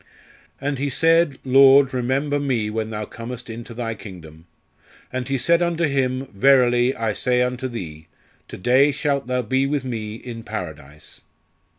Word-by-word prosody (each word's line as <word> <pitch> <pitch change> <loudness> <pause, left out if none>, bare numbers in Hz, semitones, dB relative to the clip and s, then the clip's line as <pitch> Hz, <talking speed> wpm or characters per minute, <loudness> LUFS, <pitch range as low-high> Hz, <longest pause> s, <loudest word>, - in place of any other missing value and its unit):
"_And 140 -1 -3
he 140 +1 -1
said, 165 0 +3
Lord, 135 +1 +6
remember 135 +4 0
me 120 -7 -1
when 110 0 -3
Thou 105 -1 -4
comest 115 +2 -8
into 115 +1 -9
Thy 115 -1 -3
Kingdom. 85 -6 -12 0.7
And 130 -1 -3
He 135 0 0
said 170 +7 +2
unto 170 -1 0
him, 135 -3 0
Verily, 125 +2 +4
I 115 -3 -1
say 125 +3 +1
unto 125 +1 -2
thee, 80 -10 -8 0.4
To - - -9
day 130 +8 +4
shalt 140 -2 -1
thou 125 0 -1
be 130 +4 0
with 140 -2 -2
Me 110 -4 -4
in 115 0 -8
Paradise." 80 -9 -8
125 Hz, 160 wpm, -22 LUFS, 110-135 Hz, 0.7 s, Lord